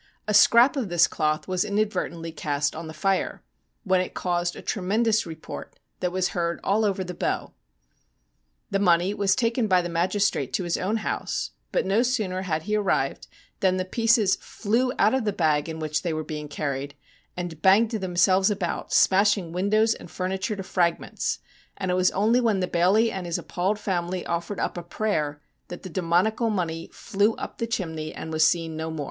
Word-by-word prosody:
A 210 - 0
scrap 235 +6 +6
of 250 -8 -2
this 175 -1 +5
cloth 155 0 -1
was 185 -1 +1
inadvertently 200 -5 -2
cast 145 -2 -1
on 160 +1 -6
tho 160 - -8
fire, 190 +4 -1 0.4
when 185 -3 +2
it 185 - -5
caused 175 -1 -1
a - - -8
tremendous 215 +2 +1
report 160 -1 -8 0.2
that 180 - -1
was 185 0 0
heard 170 -1 -2
all 210 +3 +2
over 195 -2 0
the 180 0 -6
Bow. - - -2 1.2
The 195 - +1
money 180 0 +3
was 200 -2 +2
taken 230 -1 +1
by 185 -3 +3
the 175 - -4
magistrate 175 -5 0
to 190 - 0
his 170 -1 -1
own 205 +5 -1
house, - - -2 0.2
but - - +1
no 195 +4 +3
sooner 215 -7 0
had 160 -4 -2
he 210 +3 -1
arrived 205 -2 0 0.3
than 185 -1 +2
the 185 - -1
pieces 225 0 +3
flew 235 +4 -1
out 215 - +4
of 265 -2 +1
the 210 - 0
bag 155 -5 +1
in 160 - -5
which 155 -1 -2
they 170 -3 -2
were 155 0 -2
being 150 0 -6
carried, 140 -1 -4 0.4
and 175 -3 -5
banged 200 +5 +5
themselves 190 -2 +2
about, 195 -4 -3
smashing 195 -2 +3
windows 215 +5 +2
and - - -11
furniture 190 +3 -2
to 195 - -5
fragments, 175 -2 -1 0.4
and 190 -2 -2
it - - +1
was 185 0 +4
only 225 +5 +2
when 220 -5 +2
the 180 - 0
bailie 195 +7 +3
and 185 -2 -5
his 170 - -1
appalled 190 +4 -1
family 180 -3 -2
offered 170 +4 -3
up - - -2
a - - -5
prayer 170 -5 -2 0.3
that 175 - -9
the 185 - -7
demoniacal 185 +7 +1
money 165 -5 -2
flew 210 +1 0
up - - -7
tho 230 - -1
chimney 160 -8 -3
and 160 - -7
was 155 0 +3
seen 165 -1 +2
no 160 +1 -4
more. 160 -1 -5
185 Hz, 190 wpm, -25 LUFS, 170-210 Hz, 1.2 s, scrap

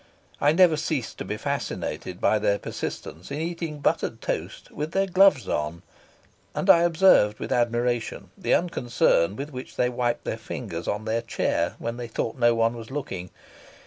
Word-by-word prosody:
I 145 - +4
never 170 -1 +5
ceased 145 -6 -3
to - - -4
be 105 +2 -3
fascinated 140 -9 -4
by 110 - +3
their 100 0 +2
persistence 85 -3 -6
in 140 +1 -4
eating 165 -2 -4
buttered - - 0
toast - - -4
with 150 +2 -4
their 195 0 +2
gloves 185 -7 +4
on, 75 +3 -2 0.7
and 195 - +5
I 170 - +6
observed 170 - +5
with - - -6
admiration 120 0 0
the 190 - +2
unconcern 120 - +2
with 140 +5 -6
which 130 -1 -8
they 125 - +2
wiped 120 -1 -1
their - - -3
fingers 85 +1 -6
on 105 +1 -2
their 115 +1 0
chair 115 - -1
when 115 +1 -4
they 120 -1 -5
thought 115 0 -3
no 120 -2 +3
one 115 +1 +2
was 115 -1 -9
looking. 95 -11 -5
120 Hz, 175 wpm, -25 LUFS, 110-155 Hz, 0.7 s, I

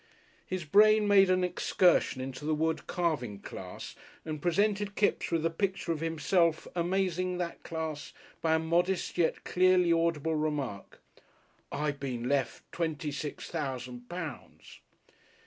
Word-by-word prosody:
His 185 -2 -3
brain 210 +5 +5
made 195 -2 +6
an 185 0 +3
excursion 180 -5 +2
into 130 +2 -6
the 155 +1 +1
wood 160 +1 -1
carving 150 - -1
class - - -8 0.3
and 155 -2 -4
presented 200 +4 +1
Kipps 210 - +1
with 165 -2 0
the 165 - +1
picture 190 0 -1
of 160 - -1
himself 165 +1 +1
amazing 180 0 0
that 175 -1 -4
class 160 -3 -5 0.3
by 160 -1 +3
a - - +4
modest 175 +3 0
yet 165 - +1
clearly 180 -1 +4
audible 165 -1 +1
remark, 150 -9 -3 0.7
"I 150 +1 0
been 130 -4 -4
left 140 -1 0
twenty 160 -3 -2
six 145 +1 -5
thousand 125 -5 -5
pounds." 165 -6 -8
165 Hz, 135 wpm, -30 LUFS, 150-180 Hz, 0.7 s, made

